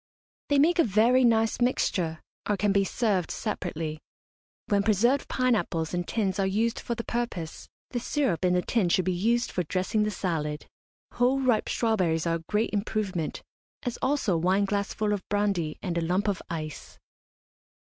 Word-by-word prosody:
They 285 - +3
make 340 +5 +4
a - - +7
very 230 +5 +4
nice 225 -1 +2
mixture, 180 -9 0 0.3
or 205 - +2
can 205 +1 +2
be 200 0 +3
served 195 -4 0
separately. 165 -7 -3 0.7
When 200 -1 +2
preserved 225 +7 +2
pine 255 -1 +2
apples 165 -6 -1
in 175 0 -1
tins 200 -3 -1
are 195 - +2
used 220 +4 0
for 235 - -3
the 230 - -4
purpose, 235 -11 -4 0.2
the 245 - -1
syrup 245 - 0
in 180 0 +3
the 180 0 +2
tin 215 -7 +1
should 185 +1 +2
be 185 - +1
used 235 +7 +1
for 180 - -1
dressing 185 +5 -1
the 210 - +1
salad. 160 -7 -3 0.5
Whole 250 +3 +2
ripe 250 -5 +1
strawberries 185 -9 +1
are 165 0 +1
a 165 - -14
great 210 +2 +1
improvement, 200 -5 -2 0.4
as 245 -2 -3
also 260 -9 +1
a 165 - 0
wineglassful 200 +3 +1
of 205 - -2
brandy 200 -7 0
and 170 -3 -1
a - - -1
lump 180 +5 0
of 200 -2 0
ice. 155 -3 -6
200 Hz, 175 wpm, -27 LUFS, 175-230 Hz, 0.7 s, a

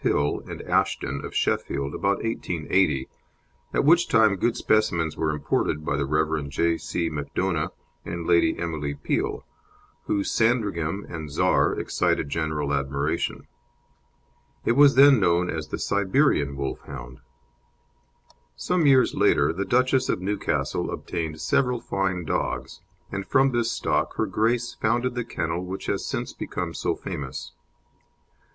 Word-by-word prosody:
Hill 75 0 +1
and - - -7
Ashton, 70 +1 0
of - - -7
Sheffield, 70 +1 -1
about 100 0 0
1880, 90 - 0 0.6
at - - +1
which 170 +3 +5
time 110 -3 +4
good 115 +5 0
specimens 85 -8 +1
were 80 - 0
imported 75 0 -1
by 70 - 0
the 70 -1 -1
Rev. 75 -1 0
J. 85 +3 +1
C. 85 -1 -2
Macdona 75 +2 -2 0.3
and 85 -1 -5
Lady 85 -1 +3
Emily 75 -4 -3
Peel, - - -2 0.6
whose 100 -1 0
Sandringham 100 -6 0
and 80 -3 -6
Czar 70 - +2
excited - - 0
general 75 -2 -1
admiration. 70 +2 -1 1.2
It - - +3
was 140 +3 +6
then 140 -1 +7
known 90 -2 +2
as 80 -1 -4
the - - -4
Siberian 100 - +1
Wolfhound. 65 -2 -6 1.4
Some 180 -4 +1
years 130 -2 +5
later - - +3
the 95 +4 -2
Duchess 130 +4 +2
of - - +1
Newcastle 100 +2 -1
obtained 80 -2 -4
several 125 - +1
fine 95 -5 -2
dogs, - - -3 0.3
and 100 0 -3
from 135 +5 +3
this 120 -1 0
stock - - -1
Her - - +1
Grace 120 +2 0
founded 120 +3 +1
the 125 -1 -2
kennel 85 -5 -3
which 95 +1 -6
has - - -1
since - - -3
become - - -4
so - - -1
famous. 70 -3 -6
85 Hz, 135 wpm, -25 LUFS, 75-115 Hz, 1.4 s, then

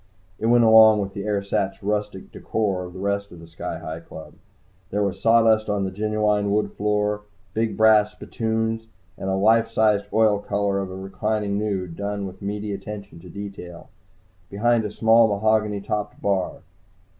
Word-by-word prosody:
It 110 - -1
went 120 0 +5
along 110 -1 +7
with 100 -1 -3
the 100 +1 -5
ersatz 100 -1 -1
rustic 105 -1 -3
decor 100 -4 -2
of 90 - -10
the 95 - -9
rest 100 +1 -2
of 85 - -12
the 85 - -11
Sky 85 0 -6
Hi 80 +1 -6
Club. 80 -1 -11 0.6
There 105 +1 0
was 100 -1 -3
sawdust 115 -1 +4
on 105 -1 0
the 95 - -2
genuine 105 0 0
wood 105 +1 0
floor, 105 0 0 0.3
big 110 +2 -1
brass 110 -1 +5
spittoons 110 0 -2 0.3
and 95 - -5
a 95 - +1
life 110 +3 +3
sized 105 -2 +2
oil 110 -2 +3
color 100 -1 -1
of 95 -1 -4
a 95 - -7
reclining 100 +2 -2
nude, 95 -5 -3
done 100 0 -3
with 95 +1 -9
meaty 105 +1 -4
attention 100 -2 -8
to 90 +1 -13
detail, 95 -3 -9 0.6
behind 115 +2 +1
a - - -2
small 115 +2 +4
mahogany 105 0 +1
topped 105 0 -4
bar. 95 -2 -1
105 Hz, 170 wpm, -23 LUFS, 100-110 Hz, 0.6 s, along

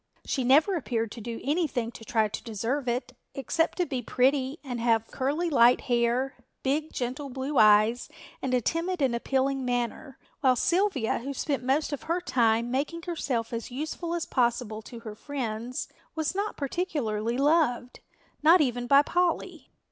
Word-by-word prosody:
She 265 - -1
never 300 +10 +4
appeared 230 -8 -2
to 230 - -8
do 230 +1 -5
anything 280 -6 0
to 225 - -12
try 220 -1 +1
to 210 - -6
deserve 235 +5 -2
it, 245 +2 -2 0.2
except 325 +5 0
to 360 - +2
be 265 -4 -3
pretty 265 +3 +1
and 250 -4 -4
have 225 -1 +1
curly 290 +7 -1
light 245 -5 +5
hair, 240 +2 0 0.3
big 300 +4 0
gentle, 260 +3 -4
blue 265 +2 -1
eyes 215 +4 +5 0.3
and 265 - -2
a 250 - +2
timid 335 - -1
and 260 -3 +2
appealing 270 +2 0
manner, 245 +2 -2 0.2
while 260 -3 +4
Sylvia, 340 - +1
who 275 +4 -5
spent 280 0 -1
most 285 +4 +1
of 285 - -4
her 335 +2 -1
time 235 -7 +1
making 300 +6 -2
herself 255 -10 -2
as 230 0 -4
useful 315 +6 -4
as 340 - -2
possible 235 -3 0
to 230 +2 -10
her 220 -2 -7
friends, 245 -1 -4 0.3
was 315 0 -1
not 405 +2 -2
particularly 250 - -2
loved, 275 -4 +2 0.4
not 330 +4 +7
even 245 -4 0
by 280 +2 +6
Polly. 355 +2 -1
260 Hz, 165 wpm, -27 LUFS, 235-300 Hz, 0.4 s, not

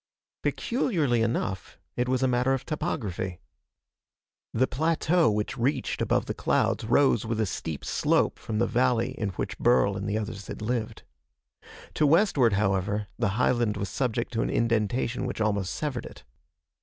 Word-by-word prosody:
Peculiarly 165 - 0
enough, 110 -4 -2 0.2
it 125 +1 0
was 130 0 +1
a - - +4
matter 125 +2 +2
of 135 - -6
topography. 105 - -3 1.1
The 125 +3 +2
plateau 160 +3 +2
which 105 +1 -2
reached 130 +5 0
above - - +1
the - - -3
clouds - - 0
rose 120 -1 +3
with 115 -1 -2
a 110 - +2
steep 80 -5 -5
slope - - +1
from 110 - -4
the 120 - +3
valley 120 -1 +1
in 105 - -3
which - - -4
Burl 110 -4 +3
and 100 +1 -3
the 105 - 0
others 105 -2 -5
had - - -6
lived. 110 -1 -3 0.9
To 150 - +3
westward, 145 - +4
however, 100 +1 0
the 115 -4 +2
highland 120 -4 +2
was 100 -2 -3
subject 120 +2 -2
to 115 - 0
an - - -1
indentation 115 +2 0
which - - -5
almost 100 -3 0
severed 140 -6 -3
it. - - -14
115 Hz, 160 wpm, -27 LUFS, 105-130 Hz, 1.1 s, a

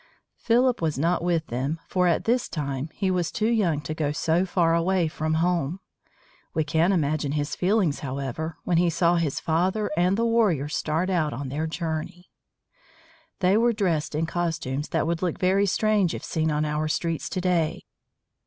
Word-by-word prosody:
Philip 245 0 +2
was 155 -4 0
not 170 +4 +1
with 170 -2 +1
them, 135 +7 -3
for 180 -1 +1
at 170 - +2
this 240 +2 +1
time 140 -1 -3
he 190 +3 -1
was 180 -3 0
too 220 0 0
young 185 -10 +1
to 155 - -4
go 150 -2 -1
so 165 +5 +1
far 170 -3 +2
away 170 +1 +2
from 155 0 -2
home. 170 0 0 0.8
We 160 - +2
can 160 +5 +2
imagine 150 -4 0
his 150 0 -2
feelings, 185 -5 +1
however, 140 +4 -4
when 175 - +1
he 175 0 +3
saw 170 +1 +2
his 160 -5 -1
father 185 +6 0
and 180 +4 +2
the 230 - +1
warriors 195 -11 +1
start 165 +5 -1
out 155 -5 +1
on 135 +2 -5
their 155 +4 -2
journey. 165 +1 -5 1.1
They 185 +3 +4
were 235 +1 +3
dressed 170 -8 -1
in 160 +2 0
costumes 165 -5 -2
that - - 0
would 165 0 -1
look 180 -3 -1
very 195 +2 +2
strange 205 -2 +2
if - - -7
seen 160 -1 -1
on 150 0 0
our 150 +1 -1
streets 155 +3 -2
to 185 - -3
day. 175 -3 0
165 Hz, 180 wpm, -25 LUFS, 155-185 Hz, 1.1 s, They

